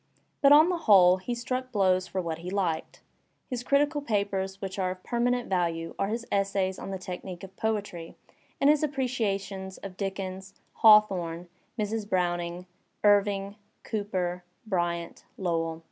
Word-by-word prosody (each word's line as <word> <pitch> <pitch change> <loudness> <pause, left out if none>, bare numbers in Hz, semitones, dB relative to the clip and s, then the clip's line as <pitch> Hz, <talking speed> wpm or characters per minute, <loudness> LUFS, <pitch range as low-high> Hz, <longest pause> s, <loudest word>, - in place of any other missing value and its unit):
But 280 - +6
on 305 +4 +8
the 360 - 0
whole 185 -2 +8
he 240 +6 -4
struck 255 +2 -3
blows 185 -3 +2
for 185 +1 -2
what 165 -1 -4
he 175 +2 -6
liked. 180 -5 -2 0.5
His 245 -1 -2
critical 290 +3 +2
papers 200 -5 -1
which 195 0 -5
are 185 -1 +1
of 185 0 -7
permanent 245 +1 0
value 170 -3 -1
are 195 - +1
his 230 +3 -3
essays 195 -1 0
on - - -6
the 195 - -3
technique 185 -1 -7
of 195 0 -10
poetiy 205 -6 -3 0.4
and 275 - +3
his 295 0 +5
appreciations 205 -9 -2
of 190 -2 -9
Dickens, 190 -1 -5 0.2
Hawthorne, 180 -6 +4 0.3
Mrs. 215 -1 -2
Browning, 175 -1 -1 0.4
Irving, 205 -1 +3 0.3
Cooper, 185 -4 -2 0.2
Bryant, 175 -4 -2
Lowell. 165 -3 -1
195 Hz, 145 wpm, -28 LUFS, 180-220 Hz, 0.5 s, on